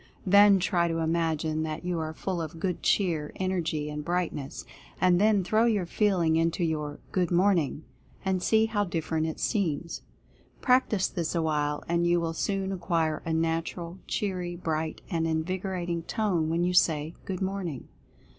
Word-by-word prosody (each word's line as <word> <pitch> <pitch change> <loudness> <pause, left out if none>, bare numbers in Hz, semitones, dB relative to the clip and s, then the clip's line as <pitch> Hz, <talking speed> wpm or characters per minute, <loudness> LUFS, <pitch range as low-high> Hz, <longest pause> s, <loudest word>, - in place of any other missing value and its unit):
Then 200 +1 +7
try 175 -2 +1
to 165 -1 -1
imagine 160 -1 0
that 160 +2 -4
you 180 -2 -1
are 155 -1 -3
full 180 +2 -3
of 160 0 -6
good 180 0 -2
cheer, 165 -7 +1
energy, 170 -5 -1
and 150 0 -4
brightness, 170 -5 -3 0.3
and 180 0 +4
then 210 -2 +4
throw 215 +5 +3
your 210 -6 +2
feeling 175 -4 +2
into 165 +2 +1
your 150 -3 -2
"good 180 -2 +1
morning," 175 -5 +2 0.4
and 190 -1 +1
see 220 +3 +3
how 215 -2 0
different 160 -3 -1
it 160 - -5
.seems. 170 -6 -1 0.6
Practice 250 -7 +3
this 170 -2 -3
awhile 150 -3 0
and 170 0 +1
you 175 0 +3
will 165 -1 -2
soon 195 +2 -1
acquire 170 -4 0
a - - 0
natural, 165 +2 -2
cheery, 180 -4 -2
bright, 160 -2 -3
and 165 -2 0
invigorating 175 +1 -2
tone 175 -4 0
when 165 +2 +1
you 180 +1 +1
say 160 -3 +2
"good 190 -1 -3
morning." 185 -8 -4
170 Hz, 160 wpm, -28 LUFS, 160-190 Hz, 0.6 s, Then